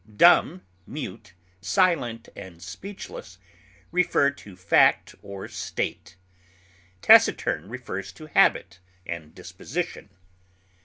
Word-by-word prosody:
Dumb, 95 - +5 0.2
mute, 115 - -8 0.3
silent 120 - +1
and 85 -3 -11
speechless 95 - -9 0.5
refer 170 -5 +2
to 105 -9 -14
fact 90 - +3
or 100 -1 -8
state; - - -5 0.9
taciturn - - +4
refers 100 -6 -6
to 155 - -12
habit 90 - +2 0.3
and 80 -3 -7
disposition. 120 - -6
100 Hz, 90 wpm, -25 LUFS, 95-140 Hz, 0.9 s, Dumb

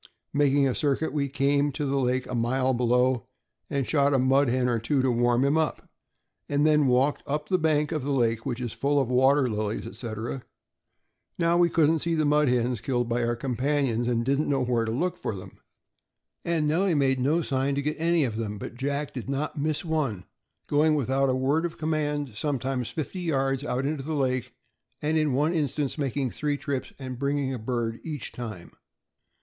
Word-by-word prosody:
Making 140 -1 +3
a 130 - 0
circuit, 145 +2 0
we 145 -2 0
came 140 +1 +2
to 150 +1 -2
the 140 0 0
lake 125 0 0
a - - -7
mile 130 +2 +1
below, 125 +1 +2 0.4
and 140 -2 -1
shot 140 -1 +2
a - - +4
mud 135 +1 +3
hen 125 +1 +1
or 120 -2 +1
two 135 +5 0
to 130 - +3
warm 120 +2 +2
him 140 +3 +2
up, 155 -3 -2 0.6
and 145 +1 +2
then 150 -2 +4
walked 130 +3 +2
up 150 +1 -2
the 185 - +2
bank 150 -2 +1
of 155 - -1
the 135 - -4
lake, 115 -4 +1
which 120 -1 -3
is 120 -3 -4
full 145 +1 +1
of 130 -3 0
water 130 +2 +4
lilies, 105 -1 -2
etc. 115 +2 -5 1.0
Now 170 0 +2
we 175 0 +4
couldn't 160 0 +3
see 170 +2 0
the 155 -1 +1
mud 150 0 +3
hens 125 -2 +1
killed 120 -3 -1
by 120 +1 0
our 120 0 0
companions, 125 -1 0
and 115 -1 0
didn't 140 +3 +1
know 135 -2 +1
where 120 -2 +1
to 110 - -2
look 180 +9 -1
for 110 - -4
them, 95 - -11 0.8
and 165 -3 0
Nellie 175 +3 +2
made 135 -2 +2
no 150 +6 +2
sign 135 0 0
to 140 - -1
get 150 +2 -1
any 170 -1 +2
of 115 -5 -2
them; 105 -2 -3
but 100 - -7
Jack 140 +3 -3
did 130 0 -6
not 140 +3 -2
miss 155 +2 -1
one, 140 - -1 0.4
going 150 +1 +3
without 135 0 +1
a 130 - +2
word 140 +5 +1
of 170 -1 -3
command 150 -3 -1
sometimes 130 0 -2
fifty 165 +4 -5
yards 135 -5 0
out 135 -2 -1
into 145 0 -1
the 155 +3 -3
lake, 130 -3 -1 0.4
and 155 +2 0
in 155 -3 +2
one 150 +6 +2
instance 150 -2 -1
making 135 -2 -1
three 145 -1 -1
trips, 140 -2 -3
and 130 -2 -7
bring 140 +1 0
ing 135 -2 -1
a 125 - -4
bird 115 0 -2
each 150 -4 -5
time. 110 -7 -7
135 Hz, 205 wpm, -26 LUFS, 125-150 Hz, 1.0 s, a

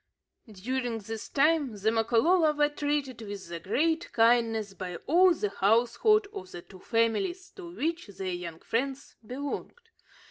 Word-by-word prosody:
During 240 +4 -3
this 220 +1 -7
time, 285 -5 +2
the 210 +2 +1
Makololo 250 +9 +3
were 295 0 +2
treated 290 -4 -2
with 200 -4 -8
the 170 -1 -5
greatest 320 - 0
kindness 225 -3 +2
by 185 -2 -6
all 360 +5 +5
the 210 - -1
household 240 - +3
of 185 - -8
the 175 - -9
two 185 - -15
families 240 - -1
to 345 -3 -8
which 330 -1 -2
their 190 -1 -5
young 170 -2 -7
friends 270 +4 -3
belonged. 270 +6 -5
235 Hz, 145 wpm, -28 LUFS, 210-300 Hz, -, all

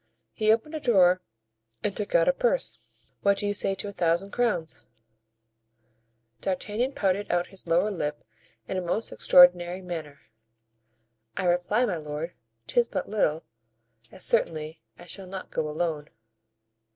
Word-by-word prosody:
He 215 0 +2
opened 230 +8 0
a 310 - -3
drawer 185 -9 +4 0.6
and 200 - -1
took 210 - -3
out - - +5
a - - +5
purse. - - 0 0.4
"What 200 -1 +3
do 205 - -3
you 205 - 0
say 195 -1 +1
to 195 - -5
a - - -5
thousand 175 +3 0
crowns?" 165 - -1 1.5
D'Artagnan 210 - -2
pouted 200 -1 0
out 175 0 +1
his 190 - -4
lower 175 +6 +2
lip 150 -6 -4 0.4
in - - -3
a - - 0
most 180 +6 -2
extraordinary 180 +1 +5
manner. 160 -5 -7 1.2
"I 190 - -1
reply, 180 +7 +2
my 190 -7 -2
lord, 150 +2 -5 0.3
'tis 240 - +2
but - - -4
little, 165 -7 0 0.7
as - - -2
certainly 160 - 0 0.2
I 175 - -13
shall 190 +1 -8
not 190 0 -8
go 155 - -2
alone." 155 -1 -2
185 Hz, 150 wpm, -27 LUFS, 165-210 Hz, 1.5 s, out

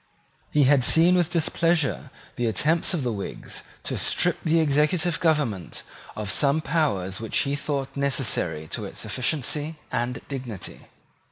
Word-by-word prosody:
He 150 - +3
had 135 -1 +4
seen 165 +7 +6
with 175 -2 +2
displeasure 165 -3 +1 0.3
the 120 - 0
attempts 155 - +1
of 155 - -2
the 120 - 0
Whigs 100 -2 -6 0.2
to - - -3
strip 175 -1 +1
the 165 0 +3
executive 160 +3 +2
government 145 - 0 0.3
of 105 -2 -2
some 140 +8 +3
powers 130 - -1
which 115 -1 -2
he 140 0 0
thought 140 -2 -3
necessary 125 - 0
to - - -4
its - - -7
efficiency 150 +4 -1 0.2
and 120 +1 -1
dignity. 125 -9 -7
145 Hz, 145 wpm, -25 LUFS, 120-160 Hz, 0.3 s, seen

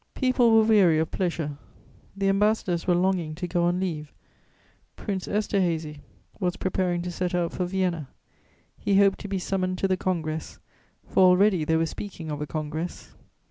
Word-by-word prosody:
People 255 -2 +3
were 225 0 +6
weary 200 -7 +5
of 160 0 0
pleasure; 160 -6 -2 0.6
the 195 0 0
ambassadors 195 -3 +1
were 175 - +4
longing 175 -3 0
to 180 +2 -4
go 175 0 +1
on 175 +1 +1
leave; 155 -5 -3 0.8
Prince 195 -3 -4
Esterhazy 170 -7 -1 0.4
was 180 -3 0
preparing 180 -2 -1
to 180 - -4
set 180 +1 -2
out 175 -1 0
for 180 - -2
Vienna: 180 -6 -1 0.7
he 200 - +2
hoped 195 -1 +4
to 205 - -7
be 195 -1 -2
summoned 185 0 -1
to 195 - +1
the 185 -1 +1
Congress, 160 -4 -3 0.5
for - - +1
already 185 -1 +5
they 160 - +2
were 165 - +2
speaking 165 -2 -7
of 150 0 -4
a 150 - -3
congress. 155 +3 -5
180 Hz, 170 wpm, -26 LUFS, 165-195 Hz, 0.8 s, were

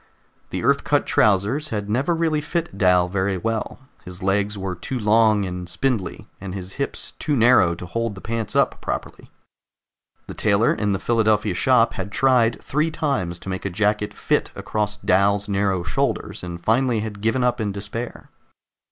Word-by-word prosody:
The - - -4
Earth - - +3
cut - - +1
trousers 110 +9 +2
had 105 -5 -3
never 130 +11 +1
really 160 -2 +1
fit 170 +2 -3
Dal 90 -3 +4
very 95 +1 -1
well; 110 +3 -3 0.3
his 90 0 -9
legs 100 +2 +1
were 95 -1 -3
too 90 +9 -4
long 110 -2 +3
and 90 -1 -5
spindly, 120 -4 -2
and 95 -1 -6
his 95 0 -7
hips 140 - -4
too 150 - 0
narrow 115 -8 +5
to 90 - -8
hold 115 +3 -3
the - - -9
pants 115 -2 -3
up - - +2
properly. - - -5 1.0
The - - -8
tailor 105 +1 +2
in 105 -2 0
the - - 0
Philadelphia 110 -2 +1
shop 120 +4 +3
had 95 +1 -5
tried 125 -1 +3
three 150 +3 0
times 135 - -2
to 95 - -9
make 95 -1 -4
a 100 - -2
jacket 105 +2 0
fit - - 0
across 105 -1 -2
Dal's 100 +2 +2
narrow 100 -3 0
shoulders, 100 - -2
and 85 -1 -6
finally 115 +3 +1
had 105 -2 -6
given 115 +4 +1
up 125 -1 +1
in 105 -2 -1
despair. 105 +4 -6
105 Hz, 175 wpm, -22 LUFS, 95-115 Hz, 1.0 s, narrow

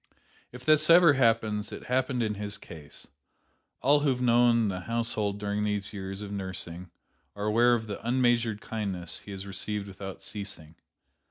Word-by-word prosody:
If 125 +1 -11
this 155 0 +4
ever 170 -2 +8
happens, 110 -5 +1
it - - -8
happened 125 -1 0
in 105 -1 -1
his 100 0 -4
case. 75 -4 -10 0.8
All 145 +3 +5
who 145 0 +1
have 125 -2 0
known 120 -2 +4
the 95 -2 -2
household 110 -1 0
during 105 0 -2
these 105 -1 -2
years 95 0 -6
of 100 - -7
nursing 95 -3 -4 0.5
are 100 0 -4
aware 120 +3 +4
of 110 -1 -3
the 105 -2 -6
unmeasured 120 -3 +1
kindness 95 -6 -4
he - - -13
has 95 0 -6
received 100 +1 -3
without 95 0 -8
ceasing. 95 -7 -7
105 Hz, 165 wpm, -28 LUFS, 100-120 Hz, 0.8 s, ever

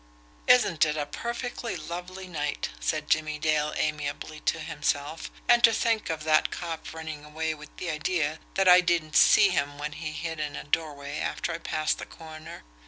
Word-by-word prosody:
"Isn't 155 +5 +5
it 155 -1 +1
a 145 - -1
perfectly 235 - -4
lovely 180 +3 -6
night?" 150 -4 -2
said 155 -1 -1
Jimmie 155 -1 +1
Dale 150 -1 +1
amiably 150 0 -2
to - - +3
himself. 145 0 -2 0.2
"And 240 0 +5
to 230 - +9
think 225 -1 +1
of 160 -2 -3
that 155 0 +3
cop 165 -2 -5
running 160 -2 -7
away 160 +1 -2
with 150 -1 -11
the 175 - -3
idea 155 0 -1 0.2
that 195 -1 +3
I 180 0 +9
didn't 170 -4 0
see 205 -2 +7
him 145 -5 -1
when 150 +1 -4
he 155 +1 -5
hid 160 0 -4
in 150 -1 -3
a - - -5
doorway 145 -1 -2
after - - -2
I 165 - -4
passed 155 -2 -1
the - - -7
corner! 155 - -10
155 Hz, 180 wpm, -27 LUFS, 150-170 Hz, 0.2 s, to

